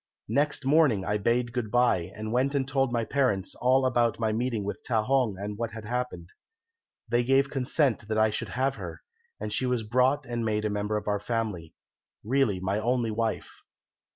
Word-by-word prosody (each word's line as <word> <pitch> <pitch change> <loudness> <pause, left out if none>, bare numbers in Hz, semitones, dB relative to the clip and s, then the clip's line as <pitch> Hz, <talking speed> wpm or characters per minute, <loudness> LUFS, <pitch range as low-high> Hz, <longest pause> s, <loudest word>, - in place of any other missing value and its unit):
"Next 145 -1 0
morning 135 -9 +4
I 105 - +1
bade 120 +2 +1
good 120 -4 -2
bye, 105 -7 +2
and 110 +1 -5
went 130 +4 +1
and 135 -2 0
told 135 -2 +1
my 120 -1 0
parents 125 -9 0
all 130 +1 +2
about 120 -3 +2
my 110 -1 +1
meeting 115 -1 -1
with 105 - -4
Ta 110 -3 +1
hong 125 -5 +1
and 105 +2 -5
what 115 -1 -3
had 110 -1 -8
happened. 120 -7 -3 0.8
They 120 +1 +2
gave 135 +2 +3
consent 130 -4 0
that 110 -1 -1
I 110 0 +4
should - - -4
have 135 +2 -1
her, - - -8 0.4
and - - -4
she 130 - 0
was 125 -2 0
brought 130 +5 +2
and 120 -2 -3
made 105 -1 0
a 105 - 0
member 105 +1 -1
of 105 - -6
our 105 -1 +1
family, 105 -7 -3 0.5
really 120 -4 +1
my 95 +3 -1
only 120 0 0
wife. 110 0 -3
115 Hz, 195 wpm, -27 LUFS, 105-130 Hz, 0.8 s, morning